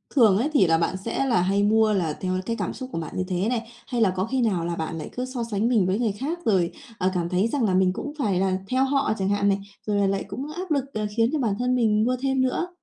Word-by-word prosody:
thường 220 Hz, -8 st, +6 dB
ấy, 270 Hz, +7 st, +1 dB
thì 195 Hz, -, +5 dB
là 165 Hz, 0 st, +4 dB
bạn 170 Hz, +3 st, 0 dB
sẽ 230 Hz, +7 st, -2 dB
là 235 Hz, -8 st, +2 dB
hay 195 Hz, +3 st, +2 dB
mua 215 Hz, +1 st, +4 dB
là 170 Hz, -6 st, 0 dB
theo 185 Hz, -1 st, -1 dB
cái 230 Hz, +1 st, -1 dB
cảm -, -, -3 dB
xúc 260 Hz, -1 st, -7 dB
của 165 Hz, -, -3 dB
bạn 160 Hz, -, -6 dB
như 185 Hz, -, 0 dB
thế 185 Hz, +4 st, 0 dB
này, 230 Hz, -2 st, -2 dB, 0.2 s
hay 245 Hz, -3 st, -1 dB
là 215 Hz, -, +5 dB
có 185 Hz, +1 st, 0 dB
khi 255 Hz, +3 st, -1 dB
nào 190 Hz, -8 st, +1 dB
là 170 Hz, 0 st, -2 dB
bạn 165 Hz, 0 st, -4 dB
lại 155 Hz, -, -6 dB
cứ 250 Hz, -, -2 dB
so 255 Hz, -2 st, -4 dB
sánh 220 Hz, -1 st, -1 dB
mình 220 Hz, -7 st, +3 dB
với 195 Hz, +4 st, 0 dB
người 230 Hz, -3 st, +1 dB
khác 280 Hz, -, -4 dB
rồi, 185 Hz, -6 st, +2 dB, 0.3 s
ờ, 185 Hz, +1 st, +1 dB
cảm 175 Hz, -2 st, -1 dB
thấy 185 Hz, +4 st, +2 dB
rằng 260 Hz, +2 st, -1 dB
là 200 Hz, -4 st, +2 dB
mình 185 Hz, 0 st, +3 dB
cũng 290 Hz, +8 st, -5 dB
phải 200 Hz, -9 st, +1 dB
là 190 Hz, 0 st, +1 dB
theo 255 Hz, +1 st, +2 dB
họ 275 Hz, -4 st, +1 dB
chẳng 190 Hz, 0 st, -1 dB
hạn 200 Hz, 0 st, +2 dB
này, 195 Hz, -, +1 dB, 0.3 s
rồi 205 Hz, -, +1 dB
là 200 Hz, -1 st, +3 dB
lại 195 Hz, 0 st, 0 dB
cũng 265 Hz, +9 st, -6 dB
áp 360 Hz, +2 st, -6 dB
lực, 280 Hz, -3 st, +2 dB
ờ, 215 Hz, -1 st, -2 dB
khiến 230 Hz, 0 st, +4 dB
cho 310 Hz, -, +1 dB
bản 220 Hz, -6 st, 0 dB
thân 250 Hz, +1 st, +1 dB
mình 215 Hz, -3 st, +3 dB
mua 255 Hz, -, +1 dB
thêm 265 Hz, -1 st, +1 dB
nữa? 260 Hz, +7 st, 0 dB
215 Hz, 300 wpm, -24 LUFS, 190-255 Hz, 0.3 s, thường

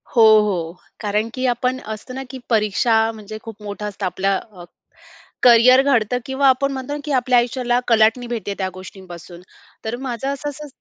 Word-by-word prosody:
हो, 230 Hz, -, +6 dB, 0.2 s
हो. 175 Hz, -6 st, -2 dB, 0.3 s
कारण, 210 Hz, +2 st, -1 dB
की 255 Hz, 0 st, -3 dB
आपण 250 Hz, +2 st, 0 dB
असतं 255 Hz, +4 st, -9 dB
ना, 265 Hz, -, -5 dB
की 265 Hz, -, -7 dB
परीक्षा 225 Hz, +1 st, +2 dB
म्हणजे 215 Hz, -1 st, -9 dB
खूप 225 Hz, -2 st, -10 dB
मोठं 205 Hz, 0 st, -6 dB
असतं. 200 Hz, -1 st, -6 dB
आपल्या 195 Hz, +2 st, 0 dB
अ, 190 Hz, -6 st, -12 dB, 0.8 s
करियर 250 Hz, +2 st, +7 dB
घडतं 250 Hz, -4 st, +1 dB
किंवा 270 Hz, +1 st, +1 dB
आपण 275 Hz, +2 st, +2 dB
म्हणतो 265 Hz, +1 st, -5 dB
ना, 295 Hz, -, -4 dB
की 295 Hz, -, -4 dB
आपल्या 250 Hz, -1 st, +3 dB
आयुष्याला 245 Hz, 0 st, 0 dB
कलाटणी 225 Hz, +2 st, +3 dB
भेटते 220 Hz, -4 st, -4 dB
त्या 190 Hz, -1 st, -2 dB
गोष्टींपासून. 180 Hz, -2 st, -11 dB, 0.4 s
तर 220 Hz, +2 st, -2 dB
माझं 245 Hz, +1 st, -4 dB
असं-असं 290 Hz, +1 st, -5 dB
230 Hz, 170 wpm, -20 LUFS, 210-255 Hz, 0.8 s, करियर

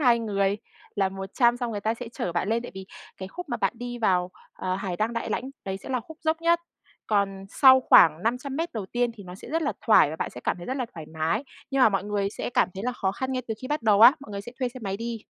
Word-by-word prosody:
2 245 Hz, -4 st, +5 dB
người 200 Hz, -2 st, 0 dB, 0.4 s
là 195 Hz, -1 st, +2 dB
100 195 Hz, +6 st, +1 dB
xong 245 Hz, -2 st, -3 dB
người 205 Hz, -2 st, -4 dB
ta 220 Hz, +2 st, 0 dB
sẽ 235 Hz, 0 st, -7 dB
chở 175 Hz, -, -3 dB
bạn 175 Hz, +3 st, -1 dB
lên, 230 Hz, +1 st, +1 dB
tại -, -, -8 dB
vì 190 Hz, 0 st, -8 dB, 0.3 s
cái 190 Hz, 0 st, -7 dB
khúc 360 Hz, -, -8 dB
mà 240 Hz, -, -1 dB
bạn -, -, 0 dB
đi 245 Hz, 0 st, -6 dB
vào, 180 Hz, -4 st, +1 dB, 0.2 s
ờ, 185 Hz, 0 st, -3 dB
Hải 190 Hz, -3 st, -4 dB
Đăng 220 Hz, +2 st, 0 dB
Đại 230 Hz, -, -3 dB
Lãnh 260 Hz, -, -2 dB
đấy 190 Hz, 0 st, -3 dB
sẽ 195 Hz, -, -11 dB
là 255 Hz, -2 st, 0 dB
khúc 320 Hz, +6 st, -13 dB
dốc 320 Hz, +1 st, +1 dB
nhất. 340 Hz, 0 st, +3 dB, 0.5 s
Còn 195 Hz, -2 st, 0 dB
sau 260 Hz, +2 st, +7 dB
khoảng 165 Hz, -8 st, +6 dB
500 250 Hz, +5 st, -2 dB
mét 330 Hz, +2 st, -2 dB
đầu 215 Hz, -5 st, -4 dB
tiên 240 Hz, +3 st, 0 dB
thì 210 Hz, -, -11 dB
nó 180 Hz, 0 st, -9 dB
sẽ -, -, -11 dB
rất 325 Hz, +1 st, 0 dB
là 290 Hz, -, 0 dB
thoải 210 Hz, -9 st, +6 dB
và 160 Hz, -, -5 dB
bạn -, -, -3 dB
sẽ 125 Hz, -, -10 dB
cảm -, -, 0 dB
thấy 175 Hz, -, -9 dB
rất 260 Hz, -, -2 dB
là 255 Hz, -, -2 dB
thoải 160 Hz, -2 st, -8 dB
mái. 160 Hz, -, -1 dB, 0.3 s
Nhưng 270 Hz, -1 st, +1 dB
mà -, -, +8 dB
mọi 195 Hz, -1 st, -1 dB
người 200 Hz, -1 st, -1 dB
sẽ -, -, -5 dB
cảm -, -, +2 dB
thấy 195 Hz, -, -6 dB
là 250 Hz, -, 0 dB
khó 195 Hz, -5 st, -1 dB
khăn 260 Hz, +4 st, -3 dB
ngay 255 Hz, -1 st, -2 dB
từ 220 Hz, -, -1 dB
khi 255 Hz, -, -5 dB
bắt 295 Hz, -4 st, -1 dB
đầu 210 Hz, -2 st, +4 dB
á, 240 Hz, +4 st, +10 dB
mọi 250 Hz, -, -11 dB
người 200 Hz, 0 st, -4 dB
sẽ 240 Hz, +4 st, -10 dB
thuê 255 Hz, -2 st, 0 dB
xe 255 Hz, +1 st, -11 dB
máy 195 Hz, -1 st, -2 dB
đi. 230 Hz, 0 st, -4 dB
225 Hz, 295 wpm, -26 LUFS, 195-255 Hz, 0.5 s, á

